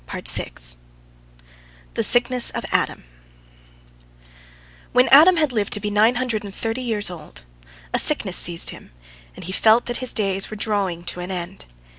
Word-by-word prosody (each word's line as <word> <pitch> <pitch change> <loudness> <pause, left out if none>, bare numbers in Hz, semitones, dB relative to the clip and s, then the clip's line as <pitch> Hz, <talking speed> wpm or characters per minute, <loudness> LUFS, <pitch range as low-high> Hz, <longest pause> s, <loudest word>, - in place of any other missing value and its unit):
THE - - -2
SICKNESS 245 0 +4
OF - - -4
ADAM - - -1 1.9
When 250 +1 +3
Adam 325 +6 +7
had 305 -4 +1
lived 215 -4 -2
to 205 - +2
be 210 0 -4
nine 215 +4 +3
hundred 240 -4 -3
and 200 - -8
thirty 225 +5 -4
years 215 -6 -1
old, 105 - -11 0.5
a - - +2
sickness - - +2
seized 170 -1 +4
him, - - -15 0.4
and - - -10
he 185 - -5
felt 220 +4 +3
that 240 - -3
his 255 -1 +3
days 195 -2 -1
were 215 - -8
drawing 200 -5 -3
to 175 +1 -5
an 180 +1 -7
end. 175 - -6
210 Hz, 155 wpm, -20 LUFS, 185-245 Hz, 1.9 s, Adam